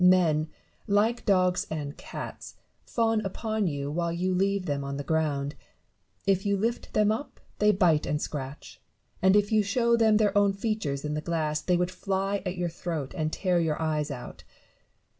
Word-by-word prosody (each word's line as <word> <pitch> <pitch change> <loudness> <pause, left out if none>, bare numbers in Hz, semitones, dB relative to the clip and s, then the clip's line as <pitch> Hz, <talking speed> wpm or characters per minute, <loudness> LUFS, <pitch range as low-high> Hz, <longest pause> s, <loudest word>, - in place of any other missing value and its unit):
Men, 170 -4 +4 0.4
like 215 +3 +2
dogs 185 -2 +3
and 150 -2 -4
cats, - - -8 0.3
fawn 225 -2 +1
upon 215 +1 -1
you 140 -2 -3
while 170 +2 -1
you 180 +2 0
leave 195 +1 +1
them 140 -3 -1
on 140 0 -4
the 145 - -4
ground; 145 -2 0 0.7
if 195 -1 +2
you 200 -1 +1
lift 230 +4 -2
them 210 0 +3
up 230 +7 -4 0.2
they 210 0 +5
bite 175 -6 +3
and 150 - 0
scratch; 140 -2 -6 0.4
and 190 +1 +5
if 205 0 +3
you 215 -1 +5
show 235 +4 +2
them 220 -2 +4
their 210 -2 +2
own 200 -1 +4
features 195 -10 -2
in 150 - -2
the 150 - -2
glass, 155 -2 -1
they 180 +3 +2
would 180 +1 0
fly 195 +1 -1
at 180 0 -3
your 175 0 0
throat 165 -4 -4
and 155 -3 -1
tear 180 -1 +1
your 160 -3 0
eyes 155 -2 0
out. 130 -4 -8
180 Hz, 180 wpm, -28 LUFS, 155-205 Hz, 0.7 s, they